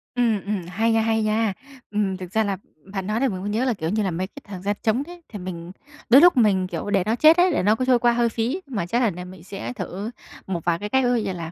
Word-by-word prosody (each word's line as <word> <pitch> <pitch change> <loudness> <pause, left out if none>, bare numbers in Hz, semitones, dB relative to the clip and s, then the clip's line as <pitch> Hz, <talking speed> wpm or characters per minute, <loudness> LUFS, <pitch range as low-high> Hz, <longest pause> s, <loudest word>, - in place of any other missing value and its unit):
Ừm, 230 -5 +2
ừm, 200 -4 -2
hay 220 +5 +1
nha, 225 - +3
hay 220 0 +1
nha! 215 -1 +1 0.4
Ừm, 200 -3 0
thực 185 -1 -8
ra 220 0 +2
là, 200 -2 -2 0.4
bạn 195 -1 -3
nói 215 +2 0
làm 270 - +2
mình 185 -1 -5
mới 205 - -3
nhớ 225 +5 0
là, 250 - +2
kiểu 160 -5 -3
như 210 +3 0
là, 190 - -1
mấy 185 +3 -2
cái 285 +8 -13
thời 190 -3 -8
gian 205 +1 -1
trống 230 +5 +1
đấy, 350 0 -11
thì 210 - -7
mình 180 -1 -7 0.4
đôi 265 +5 +8
lúc 350 -6 +6
mình, 195 -5 +3
kiểu, 205 - -5
để 195 -3 +2
nó 220 +3 0
chết 315 +6 +6
ấy, 360 +1 +4
để 295 - 0
nó 210 +3 +4
cứ 255 +3 -1
trôi 250 -2 +4
qua 240 0 +4
hơi 235 0 +2
phí 240 +11 -2
mà 205 -10 -3
chắc 235 +7 0
đợt 230 - +3
này 180 +1 -7
mình 180 -2 -12
sẽ 195 +5 -6
thử 200 0 -5 0.4
một 175 -4 -3
vài 170 -1 +1
cái 210 - -5
cách. 265 +3 +2
Ví 245 - +2
dụ 245 - +2
như 190 - -2
là, 165 -2 -6
210 Hz, 300 wpm, -23 LUFS, 185-240 Hz, 0.4 s, đôi